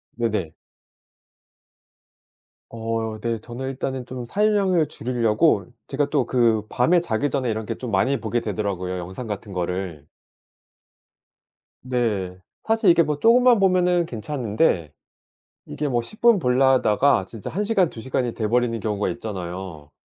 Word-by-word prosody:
네네. 105 Hz, -9 st, -2 dB, 2.2 s
어 115 Hz, -1 st, -3 dB
네. 115 Hz, -1 st, -1 dB
저는 120 Hz, +4 st, -6 dB
일단은 130 Hz, -1 st, -4 dB
좀 125 Hz, -1 st, -6 dB
사용량을 195 Hz, -, +2 dB
줄이려고 115 Hz, -, +1 dB, 0.2 s
제가 145 Hz, +1 st, -1 dB
또 140 Hz, -4 st, +1 dB
그 115 Hz, -4 st, +2 dB
밤에 165 Hz, +12 st, +3 dB
자기 145 Hz, -3 st, -1 dB
전에 130 Hz, -4 st, -1 dB
이렇게 110 Hz, -1 st, -3 dB
좀 125 Hz, -3 st, -6 dB
많이 130 Hz, +8 st, +1 dB
보게 115 Hz, +2 st, -1 dB
되더라고요 100 Hz, -4 st, -3 dB
영상 95 Hz, +7 st, -6 dB
같은 105 Hz, -2 st, -6 dB
거를. 90 Hz, -4 st, -4 dB, 1.7 s
네. 110 Hz, -8 st, -2 dB, 0.3 s
사실 225 Hz, -3 st, +2 dB
이렇게 170 Hz, -1 st, +6 dB
뭐 150 Hz, -1 st, -2 dB
쪼금만 240 Hz, +1 st, +5 dB
보면 180 Hz, -2 st, +3 dB
괜찮은데 115 Hz, -, -1 dB, 0.7 s
이게 150 Hz, -, -4 dB
뭐 120 Hz, -3 st, +1 dB
10 215 Hz, -, -12 dB
분 235 Hz, -4 st, +6 dB
보려다가 130 Hz, -, +3 dB
진짜 115 Hz, -3 st, -8 dB
1 200 Hz, +5 st, -2 dB
시간 200 Hz, -5 st, +2 dB
2 115 Hz, -, -10 dB
시간이 125 Hz, -1 st, -2 dB
돼 110 Hz, -, -2 dB
버리는 120 Hz, 0 st, +1 dB
경우가 105 Hz, -2 st, -1 dB
있잖아요. 90 Hz, -6 st, -6 dB
120 Hz, 265 characters per minute, -23 LUFS, 105-145 Hz, 2.2 s, 이렇게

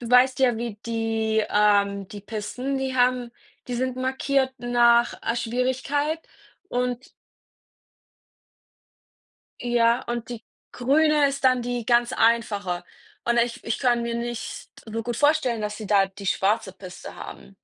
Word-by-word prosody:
du 235 Hz, -1 st, -6 dB
weißt 250 Hz, +1 st, +5 dB
ja, 245 Hz, -3 st, +4 dB
wie 230 Hz, -2 st, -4 dB
die 225 Hz, -1 st, 0 dB
ähm, 200 Hz, -2 st, +2 dB
die 205 Hz, -, -8 dB
Pisten, 225 Hz, +6 st, -4 dB
die 265 Hz, -1 st, -2 dB
haben 250 Hz, -1 st, +2 dB, 0.4 s
die 250 Hz, -, -2 dB
sind 255 Hz, +1 st, -1 dB
markiert 265 Hz, +1 st, 0 dB
nach, 240 Hz, 0 st, +4 dB
äh, 230 Hz, -, -1 dB
Schwierigkeit 260 Hz, +6 st, -1 dB, 0.5 s
und 250 Hz, -1 st, -2 dB, 2.5 s
Ja, 240 Hz, 0 st, +2 dB
und 240 Hz, -1 st, -4 dB
die 240 Hz, -2 st, -7 dB, 0.3 s
grüne 295 Hz, +3 st, +3 dB
ist 275 Hz, 0 st, -4 dB
dann 255 Hz, -1 st, +4 dB
die 245 Hz, -1 st, -3 dB
ganz 240 Hz, 0 st, +3 dB
einfache 205 Hz, -7 st, +1 dB, 0.4 s
und 235 Hz, 0 st, +1 dB
ich 235 Hz, 0 st, 0 dB
ich 230 Hz, -, -2 dB
kann 240 Hz, -3 st, +2 dB
mir 235 Hz, 0 st, -2 dB
nicht 235 Hz, 0 st, -5 dB, 0.2 s
so 225 Hz, 0 st, -4 dB
gut 240 Hz, +1 st, -3 dB
vorstellen, 290 Hz, -5 st, +2 dB
dass 210 Hz, 0 st, -3 dB
sie 215 Hz, -3 st, -7 dB
da 200 Hz, -2 st, +4 dB
die 195 Hz, +1 st, -11 dB
schwarze 195 Hz, +1 st, +1 dB
Piste 185 Hz, -1 st, -10 dB
haben. 195 Hz, -, -10 dB
240 Hz, 145 wpm, -24 LUFS, 220-255 Hz, 2.5 s, weißt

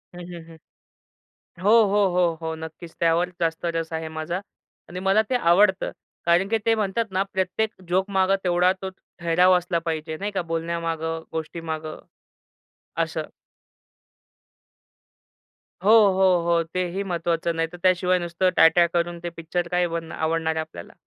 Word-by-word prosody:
हं, 180 Hz, -, -8 dB
हं, 170 Hz, -1 st, -8 dB
हं. 165 Hz, -, -13 dB, 1.1 s
हो, 205 Hz, -, +3 dB
हो, 205 Hz, 0 st, +2 dB
हो, 175 Hz, -2 st, +3 dB
हो. 160 Hz, 0 st, -3 dB
नक्कीच. 160 Hz, +1 st, -9 dB
त्यावर 170 Hz, +2 st, +2 dB
जास्त 165 Hz, +1 st, -1 dB
रस 165 Hz, 0 st, -3 dB
आहे 160 Hz, 0 st, -3 dB
माझा. 160 Hz, +3 st, -4 dB, 0.5 s
आणि 180 Hz, +1 st, -6 dB
मला 195 Hz, +3 st, +3 dB
ते -, -, +1 dB
आवडतं. 190 Hz, -1 st, +3 dB, 0.4 s
कारण 175 Hz, +3 st, +3 dB
की 225 Hz, 0 st, +1 dB
ते 225 Hz, -, +4 dB
म्हणतात 215 Hz, +1 st, 0 dB
ना 190 Hz, -, +1 dB
प्रत्येक 190 Hz, +4 st, 0 dB, 0.2 s
जोकमागं 190 Hz, +1 st, +2 dB
तेवढा 180 Hz, +1 st, +3 dB
तो 190 Hz, -, -3 dB, 0.3 s
ठहराव 175 Hz, +2 st, +4 dB
असला 175 Hz, -1 st, -2 dB
पाहिजे, 160 Hz, 0 st, -3 dB
नाही 200 Hz, +4 st, -3 dB
का, 190 Hz, -, -1 dB
बोलण्यामागं 165 Hz, -1 st, -2 dB
गोष्टीमागं. 160 Hz, -1 st, -5 dB, 1.0 s
असं. -, -, -4 dB, 2.6 s
हो, 205 Hz, -, +3 dB, 0.2 s
हो, 190 Hz, +1 st, +2 dB, 0.2 s
हो. 170 Hz, -1 st, +3 dB
तेही 185 Hz, +2 st, -1 dB
महत्त्वाचं, 170 Hz, -2 st, -1 dB
नाहीतर 165 Hz, +2 st, -2 dB
त्याशिवाय 185 Hz, 0 st, +3 dB
नुसतं 175 Hz, +2 st, 0 dB
ट्या-ट्या 170 Hz, +1 st, +6 dB
करून 170 Hz, 0 st, -1 dB
ते 175 Hz, -, -2 dB
पिक्चर 170 Hz, +1 st, -2 dB
काय 180 Hz, 0 st, +2 dB
बन 165 Hz, -1 st, -5 dB
आवडणार 160 Hz, 0 st, -1 dB
आहे 160 Hz, -, 0 dB
आपल्याला? 120 Hz, -, -10 dB
170 Hz, 145 wpm, -24 LUFS, 165-185 Hz, 2.6 s, ट्या-ट्या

